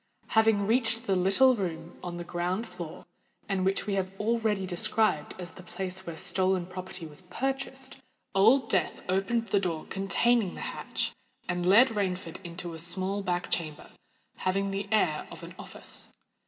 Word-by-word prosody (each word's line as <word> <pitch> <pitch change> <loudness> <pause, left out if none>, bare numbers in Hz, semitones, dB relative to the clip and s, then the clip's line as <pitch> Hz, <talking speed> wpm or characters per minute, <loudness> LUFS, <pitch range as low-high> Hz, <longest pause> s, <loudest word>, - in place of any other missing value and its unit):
Having 220 -2 +4
reached 230 +1 +2
the 195 - +2
little 195 +9 +5
room 170 -6 -4
on 175 -1 -5
the 175 - -4
ground 180 +5 -1
floor, 170 -7 -8 0.4
and 195 -2 0
which 190 +1 +1
we 205 - -1
have 190 -1 0
already 220 -3 +1
described 180 -2 +1
as 180 -1 -7
the - - -12
place 185 0 -5
where 165 -1 -5
stolen 185 0 +2
property 185 -1 -6
was 150 0 -8
purchased, 265 +7 -3 0.4
Old 225 +6 +5
Death 185 -7 +1
opened 195 +5 +1
the 200 - +4
door 170 -5 -2
containing 195 +2 +2
the - - -7
hatch, - - -2 0.3
and 180 0 0
led 230 +8 +8
Rainford 190 -4 -2
into 175 0 -6
a 165 - -7
small 185 +4 -1
back 180 -2 -1
chamber, 155 -3 -2 0.5
having 195 +1 0
the 195 +1 -2
air 180 -8 +2
of - - -10
an - - -8
office. - - -6
190 Hz, 165 wpm, -29 LUFS, 180-215 Hz, 0.5 s, led